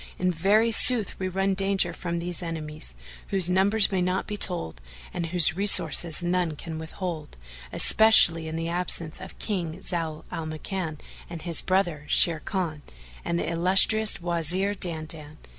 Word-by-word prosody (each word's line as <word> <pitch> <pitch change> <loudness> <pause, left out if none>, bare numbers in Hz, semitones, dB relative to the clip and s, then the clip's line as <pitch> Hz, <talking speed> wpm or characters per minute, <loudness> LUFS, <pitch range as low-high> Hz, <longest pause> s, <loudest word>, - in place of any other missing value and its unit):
In 185 0 0
very 205 +7 +1
sooth, 225 -2 +5
we 190 - -3
run 195 +1 -1
danger 195 -2 0
from 170 0 -5
these 175 0 -3
enemies, 155 - -7 0.3
whose 185 -2 0
numbers 200 +3 +2
may 190 -2 -1
not 180 +1 -2
be 210 - -6
told 125 - 0 0.3
and 170 - -4
whose 170 -1 +4
resources 175 -4 +3
none 175 -2 -1
can 160 +1 -8
withhold, 160 - -7 0.3
especially 175 -7 +5
in 160 - -6
the 165 0 -4
absence 170 -2 -4
of 190 - -11
King 175 -6 -4
Zau 165 -3 -2
al 160 -1 -5
Makan 155 0 -6 0.3
and 170 -2 -9
his 170 -2 +1
brother 175 -6 -1
Sharrkan 165 -1 0 0.4
and 170 - -2
the - - -3
illustrious 195 +6 +3
Wazir 175 +3 +1
Dandan. 155 -4 -5
175 Hz, 150 wpm, -25 LUFS, 160-190 Hz, 0.4 s, sooth